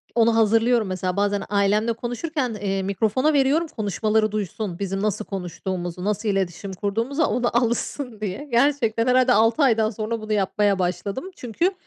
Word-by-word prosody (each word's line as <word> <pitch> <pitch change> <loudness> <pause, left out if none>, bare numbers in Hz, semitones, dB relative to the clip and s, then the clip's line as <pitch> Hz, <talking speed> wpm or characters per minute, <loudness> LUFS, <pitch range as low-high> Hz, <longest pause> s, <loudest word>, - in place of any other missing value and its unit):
onu 230 -1 +4
hazırlıyorum. 225 0 +3
Mesela 185 -1 -2
bazen 205 0 +1
ailemle 210 +3 +2
konuşurken, 250 +3 -3
eee, 195 -1 -1
mikrofona 220 +9 +1
veriyorum, 285 +4 +2
konuşmaları 215 - 0
duysun. 205 -3 -4
Bizim 195 -1 -2
nasıl 210 0 -1
konuştuğumuzu, 180 -1 -5
nasıl 210 +1 -1
iletişim 190 0 -2
kurduğumuzu, 230 - -1
ona 245 -4 +1
alışsın 240 0 -1
diye. 205 +8 -4
Gerçekten 235 -2 +2
herhâlde 255 0 +4
6 225 +6 +3
aydan 225 -4 +3
sonra 220 +1 -4
bunu 215 0 -3
yapmaya 200 0 +1
başladım. 185 - -2
Çünkü 300 - -1
215 Hz, 145 wpm, -23 LUFS, 200-240 Hz, -, onu